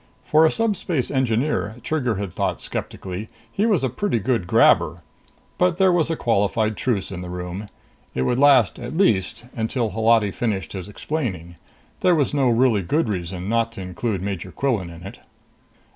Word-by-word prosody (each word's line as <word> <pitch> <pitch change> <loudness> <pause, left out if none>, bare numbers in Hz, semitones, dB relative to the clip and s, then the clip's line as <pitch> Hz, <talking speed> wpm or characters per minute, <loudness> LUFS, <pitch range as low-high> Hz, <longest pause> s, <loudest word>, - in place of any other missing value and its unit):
For 155 +1 +5
a - - +1
Subspace 195 - -1
Engineer, 125 -3 0
Trigger 130 -8 0
had 95 -2 -4
thought - - -1
skeptically, 95 +3 -5 0.2
he 210 - +1
was 200 -10 +2
a - - +3
pretty 125 - -1
good 115 -4 0
grabber. - - +4 0.6
But 180 -1 +3
there 190 -1 +4
was 170 -2 +2
a 165 - 0
qualified 110 -2 +1
truce 105 -6 -1
in 90 -2 -5
the 90 - -7
room. 90 +3 -5 0.5
It 65 - 0
would 125 - +1
last, 135 -7 +5
at 125 +6 -6
least, 110 - +1
until 115 0 -1
Holati 110 0 +3
finished 105 -3 -2
his 95 -3 -6
explaining. 105 - -4 0.5
There 180 -1 +4
was 145 -3 +1
no 135 -3 +3
really 115 -3 +3
good 130 - 0
reason 90 -1 -4
not 115 +1 +1
to 100 - -7
include 95 +1 -3
Major 95 -2 -4
Quillan 115 -10 -1
in 85 0 -11
it. 95 - -9
115 Hz, 175 wpm, -22 LUFS, 95-140 Hz, 0.6 s, For